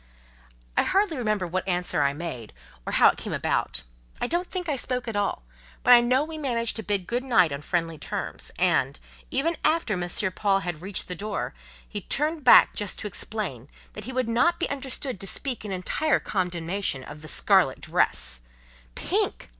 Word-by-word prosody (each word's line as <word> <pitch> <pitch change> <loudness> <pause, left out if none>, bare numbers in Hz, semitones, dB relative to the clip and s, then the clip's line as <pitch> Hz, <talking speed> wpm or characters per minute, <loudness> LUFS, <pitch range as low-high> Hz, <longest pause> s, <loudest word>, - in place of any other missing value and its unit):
I - - +5
hardly 390 -3 +2
remember 215 -7 0
what 185 +2 -3
answer 180 -1 0
I 140 - +3
made, 145 -9 -6 0.3
or - - -2
how - - +7
it - - -2
came - - -5
about; 65 -1 0 0.4
I - - 0
don't 345 +7 -1
think 365 -2 -4
I 295 - +1
spoke 250 -1 -2
at 225 - -3
all, 200 - -1 0.4
but 250 - +8
I 240 - +9
know 255 +3 +3
we 315 0 -6
managed 235 -5 -1
to - - -3
bid 200 -3 -1
good 245 +5 -1
night 190 - +4
on 140 +1 -4
friendly 165 -1 -1
terms: - - -4
and, - - +2 0.3
even 320 +6 0
after 310 -8 +2
M. 175 -2 -2 0.2
Paul 195 0 +1
had 175 -4 -4
reached 190 +1 -3
the 180 - -2
door, 205 +3 -3 0.3
he - - -5
turned 305 +1 -1
back - - +8
just 205 -2 -1
to 210 - -4
explain, 180 - -4 0.2
"that 210 - -8
he 260 - -5
would 255 -2 0
not 330 +10 +2
be - - 0
understood 265 -4 -4
to 195 - -4
speak 255 +3 -3
in 210 - -5
entire 195 +12 +1
condemnation 180 -5 -2
of 150 +3 -10
the 155 - -10
scarlet - - +3
dress" - - +1 0.5
("Pink! - - -1
210 Hz, 190 wpm, -26 LUFS, 175-260 Hz, 0.5 s, I